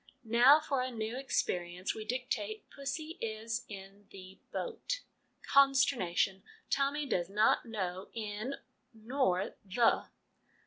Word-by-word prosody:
Now 240 +6 +7
for 280 -4 -1
a 255 - -1
new 225 -1 -3
experience. 180 -8 -1
We 215 - -6
dictate 230 -4 -3
' - - -17
pussy 310 +5 -5
is 225 +2 -3
in 195 0 -10
the 190 0 -12
boat' - - -3 0.4
Consternation! 265 -9 +3 0.3
Tommy 280 +2 +1
does 180 -9 0
not 210 +4 +3
know 190 -4 -3
' - - -39 0.2
in 220 +7 -3 0.2
' - - -45
nor 220 -5 0
' - - -43
the.' 220 +4 +2
225 Hz, 135 wpm, -33 LUFS, 195-275 Hz, 0.4 s, Now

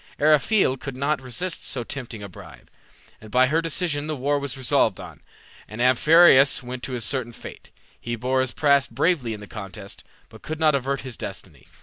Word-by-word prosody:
Eriphyle 150 0 +3
could 135 0 -7
not 140 +2 -1
resist 160 +7 -3
so 125 - -3
tempting 120 -5 -7
a - - -6
bribe, 90 - -14 0.5
and 110 - -12
by 125 +3 +4
her 155 +5 +1
decision 160 -2 -1
the 155 - -2
war 145 +2 0
was 140 -1 -5
resolved 130 -6 +1
on, - - -10 0.5
and 110 - -10
Amphiaraus 135 +2 +5
went 125 0 -7
to 130 - -5
his 120 -3 -2
certain 120 -2 -2
fate. - - -11 0.3
He 120 0 -4
bore 130 +3 0
his 130 -1 -2
part 140 -3 +2
bravely 130 -3 0
in 105 - -11
the - - -8
contest, 100 -1 -9 0.2
but - - -16
could 155 0 -6
not 155 -1 +4
avert 140 0 -1
his 130 -4 -7
destiny. - - -9
130 Hz, 195 wpm, -23 LUFS, 120-150 Hz, 0.5 s, Amphiaraus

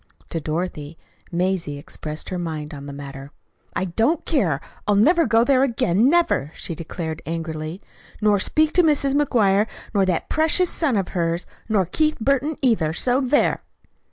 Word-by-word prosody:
To 165 - -2
Dorothy 155 -1 -4 0.3
Mazie 175 -4 -1
expressed 150 +1 -7
her 185 - -3
mind 155 -2 -5
on 140 -1 -8
the - - -6
matter. 140 -1 -8 0.5
"I 190 - 0
don't 225 - 0
care! 190 - +1 0.3
I'll 205 - +3
never 325 - +4
go 225 +1 +4
there 260 0 +3
again 230 -3 +2
never!" 295 - +2
she - - -4
declared 160 0 -5
angrily; 160 +1 -4 0.4
"nor 210 -2 +3
speak 310 +9 +2
to 360 - +6
Mrs. 285 -3 +2
McGuire, 220 -8 +3 0.3
nor 200 -2 +3
that 180 -3 0
precious 320 +3 +2
son 280 -9 0
of 195 - -1
hers, 170 -1 -1 0.2
nor 205 -4 +2
Keith 305 - +1
Burton, 275 +5 +1
either. 195 -12 +2
So 250 +9 +1
there!" 270 +2 +2
190 Hz, 160 wpm, -22 LUFS, 160-270 Hz, 0.5 s, to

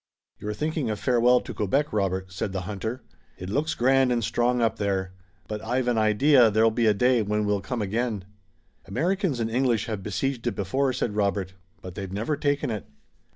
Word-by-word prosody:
"You're 105 0 -4
thinking 155 -3 -2
a 110 - 0
farewell 125 +2 +3
to - - -7
Quebec, 135 +8 0
Robert," 95 -2 -1
said 95 +1 -3
the 95 - -2
hunter. 110 +6 -5 0.3
"It 90 +1 -6
looks 150 +7 0
grand 130 +1 +3
and 120 -1 +1
strong 120 +3 +1
up 115 -1 +1
there, 95 -2 -1 0.3
but 105 0 -5
I've 125 +2 -1
an 120 -2 +2
idea 115 +4 +5
there'll 110 +2 +3
be 115 +1 +1
a 105 - +5
day 125 +3 +3
when 105 0 0
we'll 105 -1 0
come 110 +3 -3
again." 110 -1 -2 0.6
"Americans 170 - 0
and 115 -1 -1
English 120 -3 +1
have 110 -4 -4
besieged 120 +5 -2
it 115 - -1
before," 130 +8 0
said 115 -4 -2
Robert, 100 -2 0 0.3
"but 90 - -7
they've 95 0 -6
never 110 +10 -1
taken 145 -3 0
it." 105 -3 -5
110 Hz, 195 wpm, -26 LUFS, 100-125 Hz, 0.6 s, idea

